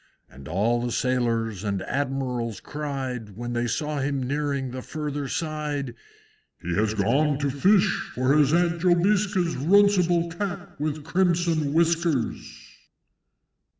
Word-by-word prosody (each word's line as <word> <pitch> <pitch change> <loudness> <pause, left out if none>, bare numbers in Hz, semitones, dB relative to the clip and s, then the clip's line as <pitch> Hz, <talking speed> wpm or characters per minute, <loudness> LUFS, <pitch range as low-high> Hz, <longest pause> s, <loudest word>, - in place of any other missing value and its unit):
And 70 +2 -13
all 110 +9 +1
the 120 - -2
Sailors 115 -5 0
and 100 -2 -2
Admirals 130 -5 -2
cried, 130 -8 -5
When 120 0 -4
they 120 0 0
saw 150 +5 -2
him 135 -1 -1
nearing 140 -1 -2
the 130 +1 -5
further 145 0 -4
side, 150 -4 -3 0.7
"He 85 - -4
has 105 +3 +1
gone 135 +8 +2
to 140 -1 -1
fish, 190 +9 +4 0.3
for 130 +3 +2
his 150 -2 +4
Aunt 170 0 +2
Jobiska's 185 0 +2
Runcible 175 +1 +3
Cat 195 -2 -5
with 150 0 -2
crimson 170 -3 +1
whiskers!" 165 -5 0
145 Hz, 125 wpm, -25 LUFS, 120-170 Hz, 0.7 s, fish